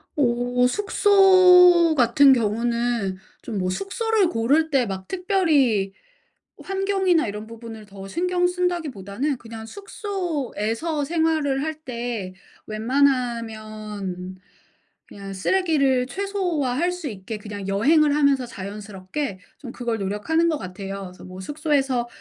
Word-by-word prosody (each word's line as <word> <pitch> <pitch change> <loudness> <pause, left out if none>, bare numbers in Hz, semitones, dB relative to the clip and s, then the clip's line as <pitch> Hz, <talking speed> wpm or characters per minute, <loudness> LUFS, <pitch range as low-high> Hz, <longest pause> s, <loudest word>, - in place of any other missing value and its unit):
어 245 -2 +2
숙소같은 360 - +6
경우는 235 -3 0 0.2
좀 215 - -5
뭐 185 -1 -1
숙소를 425 - 0
고를 280 +7 +2
때 270 -4 +2
막 190 -2 -6
특별히 310 - +1 0.7
환경이나 385 - +1
이런 210 +1 -5
부분을 225 -1 -10
더 195 -1 -10
신경 355 - 0
쓴다기보다는 300 - -2
그냥 225 -1 -9
숙소에서 320 - -3
생활을 310 -3 0
할 315 +1 -2
때 235 -7 -4 0.3
웬만하면 215 -6 -2 0.7
그냥 195 -1 -9
쓰레기를 275 - +1
최소화할 350 -5 -1
수 355 -5 -5
있게 210 +1 -7
그냥 205 -2 -7
여행을 290 +9 +3
하면서 280 -3 +3
자연스럽게 200 +2 -6 0.2
좀 250 -4 -8
그걸 235 -2 -2
노력하는 210 - 0
것 315 - 0
같아요. 195 -1 -7
그래서 - - -15
뭐 185 0 -9
숙소에서 275 - 0
250 Hz, 265 characters per minute, -23 LUFS, 215-325 Hz, 0.7 s, 숙소같은